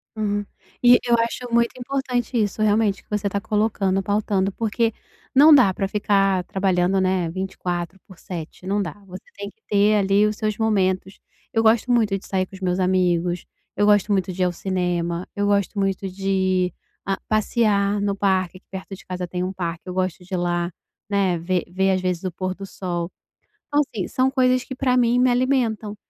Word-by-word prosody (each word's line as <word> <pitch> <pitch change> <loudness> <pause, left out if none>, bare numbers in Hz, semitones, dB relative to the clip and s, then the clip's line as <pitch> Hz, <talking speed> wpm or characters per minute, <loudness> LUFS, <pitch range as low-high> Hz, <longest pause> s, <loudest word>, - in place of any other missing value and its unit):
Uhum. 205 -1 -1 0.4
E 245 0 +8
eu 240 -1 +4
acho 235 +1 -2
muito 235 0 +4
importante 250 -2 -1
isso, 210 +1 -2
realmente, 210 -1 +2
que - - -40
você 210 -1 -1
está 200 0 -1
colocando, 200 -2 0
pautando, 200 -1 0
porque 225 +2 0 0.4
não 300 +4 +8
dá 245 -9 +6
para 195 +1 -2
ficar 195 -2 +1
trabalhando, 190 -1 +1
né, 185 -2 +1
24 180 0 -4
por 190 - -14
7, 170 0 -8
não 200 +2 0
dá, 175 -6 -4
você 185 -1 -10
tem 200 0 -6
que 220 - -25
ter 205 +1 +4
ali 200 +1 +3
os 210 0 0
seus 215 -1 -2
momentos. 190 -3 0 0.3
Eu 225 - +3
gosto 225 +2 +3
muito 220 -5 +2
de 195 - -13
sair 190 -1 0
com 195 - -13
os 190 - -13
meus 180 0 0
amigos, 180 -2 +1 0.3
eu 205 - +2
gosto 205 0 +4
muito 190 -2 +1
de 185 - -5
ir - - +4
ao 180 - +1
cinema, 175 -1 -2
eu 205 - 0
gosto 200 0 +1
muito 195 0 -1
de 190 -1 0 0.3
a 195 -1 -1
passear 210 -2 +1
no 200 -1 0
parque, 190 -2 0
aqui 185 - -22
perto 190 +1 -7
de - - -16
casa 180 -1 -4
tem 180 +1 -3
um 185 +1 -3
parque, 170 -2 -4
eu 180 - -5
gosto 185 -1 -2
de 185 - -11
ir - - +1
lá, 175 0 -1 0.4
né, 195 -3 +1
ver 175 +1 -1
ver 190 +1 +2
às 185 -1 +1
vezes 180 -1 -2
o 185 - -2
pôr 185 +2 -3
do 195 - -8
sol. 175 -2 -4 0.6
Então, 290 0 +2
assim, 220 -10 -4
são 260 +1 +1
coisas 255 -1 +2
que - - -7
pra 255 -1 +1
mim 245 0 +3
me 255 0 +4
alimentam, 245 -4 0
195 Hz, 200 wpm, -22 LUFS, 185-215 Hz, 0.6 s, E